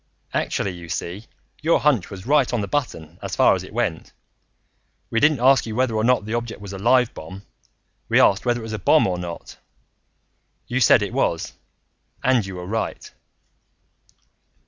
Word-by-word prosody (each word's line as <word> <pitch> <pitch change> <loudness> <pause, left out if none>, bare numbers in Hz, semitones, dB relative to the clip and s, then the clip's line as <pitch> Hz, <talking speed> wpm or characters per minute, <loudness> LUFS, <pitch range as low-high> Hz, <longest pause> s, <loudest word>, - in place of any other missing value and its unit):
"Actually, 100 - -1
you 85 -2 -10
see, 95 +8 -5 0.3
your 160 +2 +3
hunch 135 -11 +1
was 95 -2 -9
right 140 -1 +2
on 120 - 0
the 100 - -3
button 90 - -4
as - - -4
far - - +5
as - - -2
it - - -11
went. - - -3 1.0
We 115 - +2
didn't 145 +1 +3
ask 130 0 +4
you 110 - -5
whether 130 -1 +1
or 110 - 0
not 125 -2 +2
that 110 - -4
object 120 -1 -3
was 100 -1 -9
a 95 - -6
live 125 +3 +3
bomb. 95 +5 -10 0.7
We - - +4
asked 100 - +4
whether 120 -1 0
it - - -9
was 110 -1 -6
a 110 - -3
bomb 155 - +4
or 90 -2 -1
not. 85 -1 -8 1.1
You 130 - -2
said 115 -3 +5
it 100 - -5
was, 85 -11 -1 0.7
and 125 -3 +3
you 95 -1 -7
were 90 0 -7
right." 110 +4 -4
110 Hz, 185 wpm, -22 LUFS, 95-125 Hz, 1.1 s, far